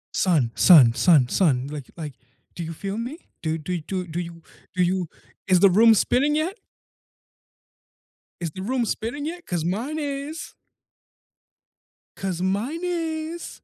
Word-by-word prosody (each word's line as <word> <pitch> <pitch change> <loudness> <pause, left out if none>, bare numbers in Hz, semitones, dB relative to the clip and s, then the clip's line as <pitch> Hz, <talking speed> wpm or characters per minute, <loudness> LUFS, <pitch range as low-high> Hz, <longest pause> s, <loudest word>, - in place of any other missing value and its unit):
Son, 155 -11 +2
son, 145 -11 +7
son, 145 0 +5
son, 135 -8 +2
like 145 -4 -7
like, 150 -4 -6 0.4
do 170 - -4
you 165 - -5
feel 195 +6 -5
me? 255 +7 -5 0.2
Do, 160 0 -1
do, 175 +3 -3
do, 185 +2 -4
do 170 +1 -5
you, 170 -1 -7 0.3
do 180 - +3
you, 180 -2 0 0.4
is 185 -2 +5
the 195 -1 +6
room 225 +3 +6
spinning 285 +8 +2
yet? 320 +5 0 1.9
Is 165 -3 -3
the 185 - -8
room 245 +3 0
spinning 240 +8 -3
yet? 345 +2 -6
'Cause 175 -3 -2
mine 245 - -2
is. 290 +2 -5 1.6
'Cause 185 -2 -3
mine 225 - -1
is 330 -1 -4
190 Hz, 145 wpm, -24 LUFS, 170-280 Hz, 1.9 s, son